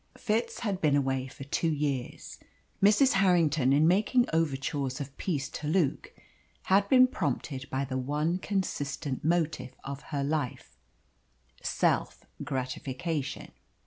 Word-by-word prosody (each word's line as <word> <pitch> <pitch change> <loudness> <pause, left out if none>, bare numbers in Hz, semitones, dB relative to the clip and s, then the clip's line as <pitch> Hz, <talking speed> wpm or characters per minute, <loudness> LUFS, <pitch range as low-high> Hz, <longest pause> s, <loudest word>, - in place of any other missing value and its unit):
Fitz 230 +2 -1
had 200 -5 -2
been 150 -3 +3
away 135 -2 0
for 135 - -10
two 150 +4 0
years. 140 -4 -3 0.4
Mrs. 215 +7 +5
Harrington 165 -8 +3
in 150 +3 +5
making 215 +7 +3
overtures 140 -3 -1
of 140 -1 -6
peace 145 -7 -2
to 150 - -6
Luke 155 -3 0 0.5
had 200 +1 +3
been 255 -1 +7
prompted 140 - -3
by 135 +1 -1
the 130 -1 -3
one 150 +7 -1
consistent 150 -8 -3
motive 160 -6 0
of 140 0 -6
her 140 -3 -1
life, 140 - -3 0.9
self - - 0 0.2
gratification. 135 +3 -3
150 Hz, 125 wpm, -29 LUFS, 135-180 Hz, 0.9 s, been